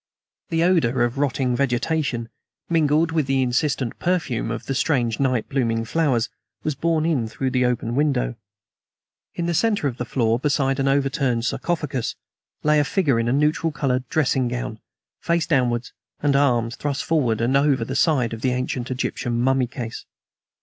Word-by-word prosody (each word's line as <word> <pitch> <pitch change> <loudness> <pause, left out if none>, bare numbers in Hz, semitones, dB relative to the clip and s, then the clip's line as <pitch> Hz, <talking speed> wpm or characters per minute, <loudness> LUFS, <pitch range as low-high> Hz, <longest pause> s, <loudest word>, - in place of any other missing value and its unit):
The 165 0 +1
odor 130 -9 +3
of 120 +3 -1
rotting 130 -3 +1
vegetation, 125 -1 -1 0.4
mingled 160 0 +3
with 155 -4 0
the 135 -1 +2
insistent 130 0 -1
perfume 165 -11 -1
of 115 - -4
the 135 - -2
strange 125 -5 0
night 130 -4 +1
blooming 115 -4 0
flowers, 130 -4 +1 0.4
was 155 - 0
borne 160 +2 0
in 140 -9 +1
through 130 +4 -3
the 125 -1 +2
open 120 -1 -1
window. 135 -3 +1 1.0
In 170 - -2
the 170 - 0
center 205 -3 +1
of 125 -3 -4
the 125 - -3
floor, 115 -1 +1
beside 135 -1 +1
an 135 - +1
overturned 135 -3 +1
sarcophagus, 145 -2 -2 0.5
lay 150 0 +4
a - - +4
figure 145 - +1
in 115 - 0
a - - +1
neutral 150 +4 +1
colored 130 -3 -1
dressing 135 -5 +1
gown, 120 -2 -4 0.4
face 170 -1 0
downwards, 125 -6 0 0.3
and 145 -1 +1
arms 120 -4 +2
thrust 145 -1 -2
forward 130 -9 +1
and 120 +3 +1
over 140 -4 +3
the 130 - -4
side 135 -6 +2
of 115 - -6
the 125 +1 +1
ancient 125 0 -3
Egyptian 125 -2 -2
mummy 130 0 +2
case. 120 -2 -7
135 Hz, 170 wpm, -23 LUFS, 120-150 Hz, 1.0 s, lay